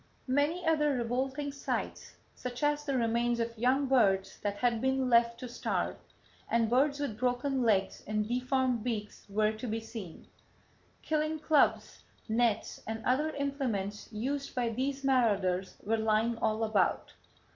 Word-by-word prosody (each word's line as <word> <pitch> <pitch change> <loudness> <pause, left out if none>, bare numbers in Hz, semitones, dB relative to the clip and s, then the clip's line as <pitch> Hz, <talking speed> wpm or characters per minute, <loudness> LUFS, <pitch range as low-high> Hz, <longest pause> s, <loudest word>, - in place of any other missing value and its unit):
"Many 290 +7 +1
other 300 -2 +3
revolting 260 +4 -2
sights, 280 - -4 0.2
such 250 +2 -6
as 295 0 +1
the 275 -2 0
remains 235 0 +1
of 230 0 -2
young 255 +5 +2
birds 205 -8 +2
that 205 -1 -2
had 235 -1 +1
been 265 -1 +1
left 235 0 +4
to 250 - -4
starve, 240 - -2 0.5
and 230 -1 +2
birds 280 +3 +3
with 240 -7 -3
broken 255 +2 0
legs 200 -5 +1
and 210 0 -1
deformed 250 -1 0
beaks 215 -4 -4
were 215 +1 +2
to 220 +3 -6
be 225 0 -1
seen. 225 -6 -9 0.8
Killing 310 0 0
clubs, 305 -1 +2 0.2
nets 225 -1 0
and 220 0 -4
other 280 +5 +2
implements 245 -9 -3
used 270 +6 -3
by 245 -2 +1
these 270 +4 -2
marauders 200 -8 +1
were 225 +2 +1
lying 220 +1 +2
all 220 +1 0
about. 215 -4 +1
240 Hz, 145 wpm, -31 LUFS, 220-270 Hz, 0.8 s, left